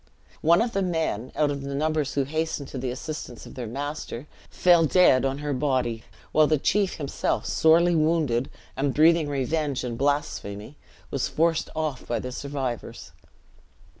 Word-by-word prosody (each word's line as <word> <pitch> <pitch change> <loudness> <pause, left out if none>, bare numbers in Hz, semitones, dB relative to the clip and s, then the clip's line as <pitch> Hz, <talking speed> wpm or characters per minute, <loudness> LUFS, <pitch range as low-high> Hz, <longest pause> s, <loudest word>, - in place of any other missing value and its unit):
One 170 +6 +5
of 235 - -3
the 195 - 0
men, 160 - -1
out 150 -1 +2
of 140 -1 -4
the 140 0 -5
numbers 155 -1 0
who 140 - +2
hastened 155 0 -2
to 135 - -6
the 125 0 -2
assistance 130 -1 -6
of - - -11
their 125 -3 -5
master, 140 0 -5 0.2
fell 175 -3 +4
dead 140 -7 +5
on 135 0 -1
her 145 - 0
body; 130 -5 0 0.3
while 155 -1 +5
the 155 - +3
chief 195 +6 +1
himself, 140 -3 -2
sorely 170 +2 +4
wounded, 155 -6 +1 0.3
and 135 -1 -1
breathing 160 0 +4
revenge 145 0 -1
and 120 -2 -4
blasphemy, 140 -5 -2 0.4
was 135 - -1
forced 165 0 +1
off 155 -5 -3
by 120 - 0
the 125 +3 -5
survivors. 135 -3 -5
145 Hz, 165 wpm, -25 LUFS, 130-160 Hz, 0.4 s, One